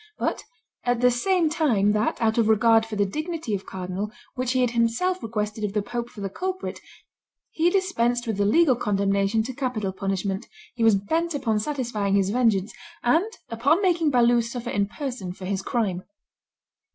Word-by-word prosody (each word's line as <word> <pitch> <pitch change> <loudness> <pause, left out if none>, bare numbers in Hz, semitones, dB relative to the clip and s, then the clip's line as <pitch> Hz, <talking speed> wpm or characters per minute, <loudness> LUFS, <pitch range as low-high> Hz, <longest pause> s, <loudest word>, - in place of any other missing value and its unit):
But - - -1 0.4
at 245 -1 +1
the 250 0 +5
same 345 +7 +2
time 265 -11 +2
that, 210 +2 0
out 225 0 +2
of 225 - +3
regard 225 +1 +4
for 220 - -5
the 205 -1 +2
dignity 310 - -4
of 195 -1 -3
cardinal, 190 +3 -4 0.2
which 255 -1 -1
he 260 - +2
had 245 -2 +2
himself 240 +11 +1
requested 210 -1 -3
of 205 -2 -2
the 210 -1 0
pope 240 +2 -4
for 210 - -11
the 195 - -2
culprit, 375 - -4 0.7
he 335 +2 +2
dispensed 245 -11 +1
with 220 -3 -2
the 200 - +2
legal 270 +5 +4
condemnation 200 0 +1
to 260 +3 -5
capital 240 -7 -2
punishment, 195 0 -2 0.3
he 235 -2 -2
was 225 -2 +6
bent 320 - -1
upon 230 -6 0
satisfying 220 -6 -1
his 195 -1 +2
vengeance, 220 -4 +2 0.3
and 330 - +2 0.2
upon 255 +9 +2
making 345 -5 +2
Balue 240 -2 +4
suffer 235 +1 -5
in 200 0 +1
person 240 -7 -5
for 185 0 -9
his 195 0 -1
crime. 195 -4 -1
230 Hz, 180 wpm, -25 LUFS, 205-265 Hz, 0.7 s, was